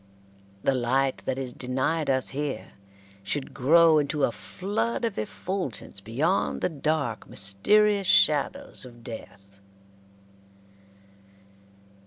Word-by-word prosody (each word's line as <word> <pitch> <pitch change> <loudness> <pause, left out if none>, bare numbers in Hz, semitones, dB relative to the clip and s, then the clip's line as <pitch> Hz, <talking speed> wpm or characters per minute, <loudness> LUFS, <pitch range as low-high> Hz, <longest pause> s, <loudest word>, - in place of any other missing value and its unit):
The 135 - +3
light 130 +2 +1
that - - -1
is 130 -2 -4
denied 135 +5 -1
us 130 -1 +1
here 145 0 -4 0.5
should 130 +8 -4
grow 160 +4 +5
into 145 0 -1
a 120 - +3
flood 115 - -2
of 225 - -2
effulgence 140 - -5
beyond 140 - 0
the - - +1
dark, 150 -6 -2
mysterious 200 - +3
shadows 150 -5 +2
of 120 -2 -13
death. 100 -4 -10
135 Hz, 105 wpm, -26 LUFS, 120-160 Hz, 0.5 s, grow